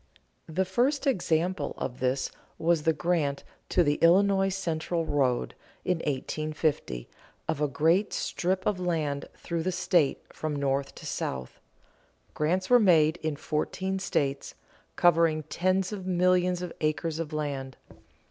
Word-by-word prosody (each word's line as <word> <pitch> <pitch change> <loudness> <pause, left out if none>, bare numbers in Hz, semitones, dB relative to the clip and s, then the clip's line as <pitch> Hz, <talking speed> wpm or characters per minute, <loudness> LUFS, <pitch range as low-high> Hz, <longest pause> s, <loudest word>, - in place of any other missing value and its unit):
The 185 +4 0
first 255 +10 +1
example 175 - 0
of 125 -1 -4
this 130 +1 0 0.3
was 165 -1 +2
the 160 - +3
grant 155 -3 0 0.3
to 180 - +4
the 145 -1 +1
Illinois 195 +3 +5
Central 170 -3 -2
road, 130 -5 +1 0.3
in 180 -1 +1
1850, 150 - -2 0.4
of 150 - -1
a 150 - +3
great 165 +8 +2
strip 185 +1 -1
of 205 -3 +1
land 155 -6 -1
through 170 -1 -3
the 185 +3 -1
state 175 -4 +2 0.2
from 155 -1 -3
north 140 -1 -1
to - - -11
south. 65 -1 -4 0.7
Grants 180 +5 0
were 245 +3 +6
made 165 -6 +4
in 155 -3 -2
fourteen 190 +6 -2
states, 140 -7 -1 0.4
covering 165 -2 +4
tens 185 +2 +1
of 190 -3 -6
millions 180 0 +2
of 180 - -5
acres 155 +1 -1
of 165 -2 -4
land. 140 -4 -3
165 Hz, 140 wpm, -28 LUFS, 150-185 Hz, 0.7 s, were